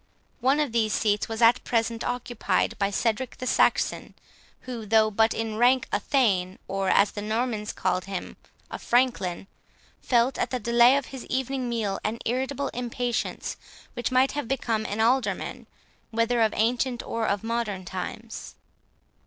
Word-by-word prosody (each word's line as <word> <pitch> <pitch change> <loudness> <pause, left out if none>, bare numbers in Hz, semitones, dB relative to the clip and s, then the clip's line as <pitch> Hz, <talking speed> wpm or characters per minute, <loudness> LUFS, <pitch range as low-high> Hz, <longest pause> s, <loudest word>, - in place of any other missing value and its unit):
One 265 +4 +3
of 295 -5 0
these 220 -2 +1
seats 210 -1 +1
was 225 +1 -1
at 230 +2 +5
present 230 -1 0
occupied 245 -2 -1
by 200 -1 +2
Cedric 230 +5 -1
the 255 - -5
Saxon, - - +1 0.5
who, 245 -3 -6
though 215 0 +4
but 220 +2 +3
in 225 -1 -3
rank 250 +2 +4
a 205 - +1
thane, 200 -8 +1
or, 195 0 -1
as 200 0 +4
the 205 - -6
Normans 215 0 -2
called 185 - -1
him, 195 -2 -5 0.4
a - - -5
Franklin, 235 -8 +1 0.6
felt, 245 +1 +2
at - - 0
the 255 - -2
delay 235 +3 +5
of 280 - -2
his 265 - -7
evening 260 -1 -2
meal, 215 -4 -1
an 220 +2 -1
irritable 265 +3 -1
impatience, 245 0 -3 0.4
which 240 - -2
might 255 +1 +4
have 290 -4 -4
become 225 -4 -1
an 205 - -4
alderman, 245 +4 0 0.4
whether 230 +1 +1
of 220 -1 +4
ancient 240 +2 +1
or 230 -1 -2
of 200 0 0
modern 225 -5 -2
times. 190 +5 -6
230 Hz, 160 wpm, -26 LUFS, 215-250 Hz, 0.6 s, at